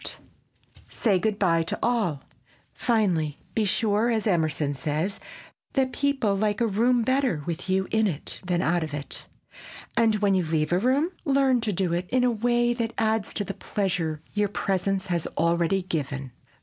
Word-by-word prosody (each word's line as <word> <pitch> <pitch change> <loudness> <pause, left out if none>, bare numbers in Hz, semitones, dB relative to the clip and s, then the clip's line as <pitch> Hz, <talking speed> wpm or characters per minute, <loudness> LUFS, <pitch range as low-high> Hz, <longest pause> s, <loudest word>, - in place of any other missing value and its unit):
[Sidenote: - - -8 0.7
SAY 200 -5 +1
GOOD 215 +1 0
BY 170 -5 +3
TO 165 - -3
ALL] 210 - 0 0.5
Finally, 180 - +1 0.2
be 220 - +1
sure, 210 +3 +2
as 225 -3 0
Emerson 155 -7 +1
says, 150 +8 -2 0.5
"that 265 -2 +1
people 270 -8 +1
like 205 +1 0
a 235 - +3
room 235 +3 +2
better 260 - +1
with 170 +2 -4
you 190 0 +1
in 220 -1 +3
it 160 -6 -5
than 180 -1 0
out 175 +2 +2
of 150 -2 -4
it," 145 -1 -8 0.7
and 225 -2 +3
when 205 -1 +2
you 185 -1 +2
leave 155 -1 0
the 175 - +3
room, 265 - +2
learn 270 -3 +3
to 220 -2 0
do 180 -2 0
it 180 +1 -2
in 255 0 +2
a 250 - +3
way 240 +1 +2
that 230 -1 -3
adds 220 -1 0
to 205 - -2
the 195 - -5
pleasure 170 -8 -2
your 205 -1 +1
presence 195 -1 -1
has 170 -3 -1
already 170 +3 +2
given. 140 -6 -3
195 Hz, 175 wpm, -26 LUFS, 170-230 Hz, 0.7 s, BY